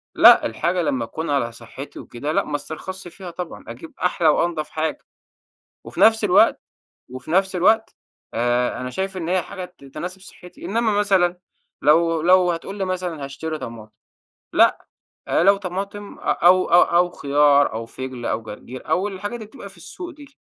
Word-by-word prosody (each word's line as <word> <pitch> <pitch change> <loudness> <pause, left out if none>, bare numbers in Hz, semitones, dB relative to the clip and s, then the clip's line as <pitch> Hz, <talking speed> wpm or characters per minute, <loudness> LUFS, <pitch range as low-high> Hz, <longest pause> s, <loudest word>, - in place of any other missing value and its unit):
لأ، - - +8
الحاجة 175 +11 -1
لمّا 130 -7 -1
تكون 160 +8 -5
على 135 -5 0
صحتي 135 +4 -10
وكده، 145 +6 -5
لأ - - +2
ما 150 - -4
استرخصش 175 +6 -7
فيها 180 0 -9
طبعًا، 175 0 -7
أجيب 125 +7 -10
أحلى 175 -2 +2
وأنظف 155 0 +1
حاجة. 160 0 -3 0.8
وفي - - -7
نفس 220 -1 +5
الوقت، 185 - +4 0.5
وفي 130 +3 -9
نفس 190 +2 +2
الوقت 220 +5 +2 0.4
آآ، 120 +1 0
أنا 125 0 -4
شايف 190 +6 -3
إن 170 -3 -4
هي 185 0 +1
حاجة 185 +1 -7
ت - - -16
تناسب 180 +7 -7
صحتي، 180 -2 -14
إنما 225 +1 0
مثلًا 185 -3 +2 0.4
لو 165 +1 +3
لو 180 0 +5
هتقول 195 +4 -6
لي 195 - 0
مثلًا 180 -5 -3
هاشتري 155 +3 -5
طماطم، 110 -4 -9 0.6
لأ - - +3 0.4
آآ - - +2
لو 200 +1 +6
طماطم 200 +2 -6
أ - - -17
أو 185 +2 +4
أو 175 0 +5
خيار 145 -2 +3
أو 115 +1 -5
فِجل 130 -1 -7
أو 115 - -1
جرجير 115 +4 -10
أو 195 +3 +1
الحاجات 205 +3 -5
اللي 220 -3 -9
بتبقى 245 - -11
في - - -18
السوق 355 -1 -9
دي، 290 -3 -14
175 Hz, 175 wpm, -22 LUFS, 140-190 Hz, 0.8 s, لأ